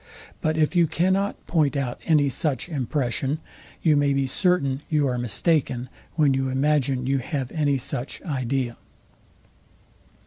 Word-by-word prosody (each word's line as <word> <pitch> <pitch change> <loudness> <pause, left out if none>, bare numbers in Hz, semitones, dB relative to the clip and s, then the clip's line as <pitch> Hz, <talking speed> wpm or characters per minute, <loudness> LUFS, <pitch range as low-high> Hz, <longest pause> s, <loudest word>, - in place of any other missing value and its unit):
But 155 0 0
if 155 +3 +2
you 170 -2 +5
cannot 190 +5 0
point 150 -5 +1
out 125 -3 -3
any 150 -4 +4
such 135 0 -1
impression, 135 0 -1 0.4
you 155 -3 +5
may 145 -1 +3
be 135 0 +1
certain 140 -3 +1
you 150 -3 +2
are 125 -1 -1
mistaken, 125 - 0 0.3
when 150 -4 +4
you 135 0 0
imagine 135 -1 +1
you 135 +1 +1
have 135 -1 -3
any 145 -3 +1
such 125 +1 -4
idea. 130 -5 -2
140 Hz, 140 wpm, -24 LUFS, 130-155 Hz, 0.4 s, you